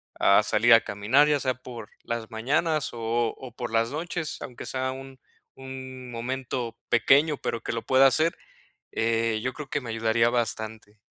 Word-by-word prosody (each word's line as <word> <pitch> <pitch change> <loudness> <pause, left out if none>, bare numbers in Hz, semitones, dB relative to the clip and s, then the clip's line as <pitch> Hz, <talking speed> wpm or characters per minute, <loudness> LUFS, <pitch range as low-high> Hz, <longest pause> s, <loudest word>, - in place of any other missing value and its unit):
a - - +5
salir 120 +1 +4
a 115 - +7
caminar, 115 +9 +3
ya 145 -1 +3
sea 130 -1 0
por 120 -3 -10
las 115 -2 -4
mañanas 145 +7 0
o 115 0 -1
o 130 -2 -9
por 120 -3 -5
las 115 +1 +1
noches, 160 +1 -4
aunque 125 - -8
sea 130 0 -2
un 135 0 -9 0.4
un 130 -1 -8
momento 120 0 -4
pequeño, 140 +6 +4
pero 115 - -3
que - - -4
lo 115 - -2
pueda 135 +1 +6
hacer, 155 +5 +2 0.5
eh, 115 -1 0
yo 130 +2 -2
creo 150 -3 -8
que 145 - -1
me 120 - -8
ayudaría 115 +1 +2
bastante. 110 -3 -3
125 Hz, 175 wpm, -26 LUFS, 115-135 Hz, 0.5 s, a